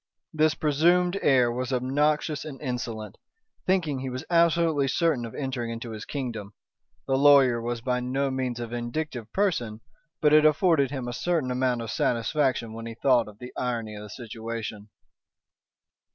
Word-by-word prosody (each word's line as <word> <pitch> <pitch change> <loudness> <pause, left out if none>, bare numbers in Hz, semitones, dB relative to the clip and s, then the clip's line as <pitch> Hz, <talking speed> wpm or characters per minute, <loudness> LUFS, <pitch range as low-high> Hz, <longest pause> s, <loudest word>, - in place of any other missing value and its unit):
This 155 0 +3
presumed 175 +5 +2
heir 125 -4 +4
was 125 +2 -3
obnoxious 145 +3 0
and 145 -3 -8
insolent, 120 -6 -5 0.5
thinking 165 -7 +1
he 130 0 -4
was 130 +4 -5
absolutely 165 -4 +3
certain 145 -3 +1
of 115 - -9
entering 130 -4 -3
into 115 0 -6
his 110 -1 -7
kingdom. 115 -8 -5 0.5
The 135 -1 +1
lawyer 135 -4 +6
was 120 0 -3
by 125 +1 0
no 135 +2 -1
means 130 -2 -2
a 120 - -3
vindictive 120 +1 -4
person, 125 - -1 0.4
but 150 -1 +3
it 155 0 +7
afforded 155 -2 +4
him 130 -3 -4
a 120 - -4
certain 155 -2 -1
amount 125 -2 0
of 115 - -5
satisfaction 120 0 0
when 115 +1 -7
he 115 - -7
thought 125 -2 +3
of 105 -1 -12
the 125 +2 -10
irony 115 -4 -3
of 105 - -8
the 105 - -9
situation. 110 -2 -6
130 Hz, 165 wpm, -26 LUFS, 115-150 Hz, 0.5 s, it